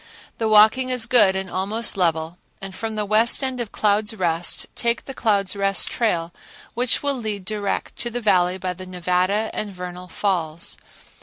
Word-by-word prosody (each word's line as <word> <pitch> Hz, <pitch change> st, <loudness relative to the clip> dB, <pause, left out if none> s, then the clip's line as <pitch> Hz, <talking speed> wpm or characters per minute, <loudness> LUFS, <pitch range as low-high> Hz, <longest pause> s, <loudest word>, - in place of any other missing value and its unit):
The 225 Hz, -1 st, 0 dB
walking 215 Hz, +5 st, +5 dB
is 250 Hz, -3 st, +2 dB
good 215 Hz, -6 st, +4 dB
and 190 Hz, 0 st, -3 dB
almost 205 Hz, +6 st, 0 dB
level 165 Hz, -2 st, 0 dB, 0.2 s
and 195 Hz, 0 st, -7 dB
from 220 Hz, +3 st, -5 dB
the 210 Hz, -1 st, -1 dB
west 220 Hz, +6 st, +3 dB
end 260 Hz, -2 st, -1 dB
of 225 Hz, -, -5 dB
Clouds' 210 Hz, +1 st, +1 dB
Rest 170 Hz, -3 st, 0 dB
take 235 Hz, 0 st, -1 dB
the 270 Hz, -, -7 dB
Clouds' 205 Hz, -5 st, 0 dB
Rest 195 Hz, 0 st, +1 dB
Trail 170 Hz, -8 st, -1 dB, 0.4 s
which 245 Hz, +2 st, 0 dB
will 285 Hz, 0 st, +2 dB
lead 215 Hz, -7 st, -4 dB
direct 205 Hz, -1 st, -3 dB
to 240 Hz, -, -1 dB
the 240 Hz, +1 st, -4 dB
Valley 185 Hz, -5 st, +2 dB
by 185 Hz, -1 st, -3 dB
the 185 Hz, +1 st, -10 dB
Nevada 185 Hz, +4 st, 0 dB
and 210 Hz, -1 st, -3 dB
Vernal 180 Hz, -1 st, -8 dB
Falls. 170 Hz, -5 st, -2 dB
200 Hz, 175 wpm, -22 LUFS, 180-225 Hz, 0.4 s, walking